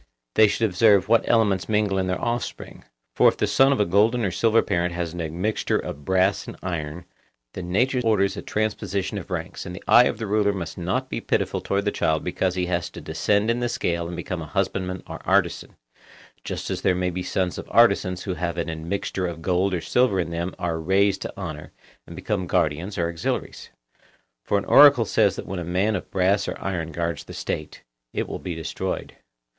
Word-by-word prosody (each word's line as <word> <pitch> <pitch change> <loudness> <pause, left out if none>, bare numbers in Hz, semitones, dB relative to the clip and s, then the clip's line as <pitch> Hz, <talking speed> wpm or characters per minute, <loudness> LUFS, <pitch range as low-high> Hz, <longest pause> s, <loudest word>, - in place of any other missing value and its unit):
They 110 - +6
should 110 +2 +1
observe 100 0 +4
what 115 +1 +3
elements 105 -5 +2
mingle 105 -2 +1
in 95 - -1
their 90 - -1
offspring; 120 +1 -4 0.3
for - - +5
if - - -5
the - - +1
son 135 +7 +4
of 135 - +1
a 105 - +3
golden 110 +6 +3
or 95 - 0
silver 115 +4 +3
parent 85 0 -1
has 85 -2 -3
an 90 - -4
admixture 85 +7 -1
of 70 0 -6
brass 95 +1 +2
and - - -8
iron, 85 -1 -4 0.5
then 90 -1 -6
nature 125 +6 +2
orders 100 -3 +2
a - - -5
transposition 100 -2 -2
of 95 - -11
ranks, 90 -2 -4
and 90 -1 -7
the - - -10
eye 120 - +7
of - - -1
the 115 - -4
ruler 100 0 +2
must 85 -4 -5
not 95 +10 -2
be - - -4
pitiful - - -1
towards 100 +1 -1
the 105 - +1
child 80 -5 0
because 90 +1 -1
he 90 -1 0
has 85 -1 -1
to - - -10
descend 105 +2 +1
in 120 - -1
the 120 0 -1
scale 85 -5 -1
and 85 - -6
become 85 0 -4
a 75 - -7
husbandman 90 +4 -2
or - - -8
artisan, - - +1 0.7
just - - -4
as - - -3
there 90 - +2
may 90 0 -1
be 90 +1 -4
sons 90 0 -2
of - - -8
artisans 95 -6 +3
who 95 - -2
having 85 -1 -3
an 80 - -6
admixture 90 +2 -2
of 80 -1 -7
gold 95 +1 +1
or 90 -3 -1
silver 125 -3 +2
in 85 -1 -2
them 85 +2 -3
are 85 -2 -2
raised 95 +3 +2
to - - -5
honour, 80 -6 -7 0.3
and - - -10
become 90 - -2
guardians 85 +6 0
or 85 -2 +1
auxiliaries. 85 -1 -4 0.7
For 100 - +1
an 100 - -2
oracle 140 -5 +7
says 105 -3 +2
that - - -6
when 95 -1 -4
a - - -4
man 95 +5 0
of - - -5
brass 95 +2 +1
or - - -4
iron 85 -4 -3
guards 85 -1 -3
the - - -10
State, 75 - -5 0.3
it - - -2
will - - -5
be 90 -3 -5
destroyed. 80 -1 -4
95 Hz, 215 wpm, -24 LUFS, 85-105 Hz, 0.7 s, eye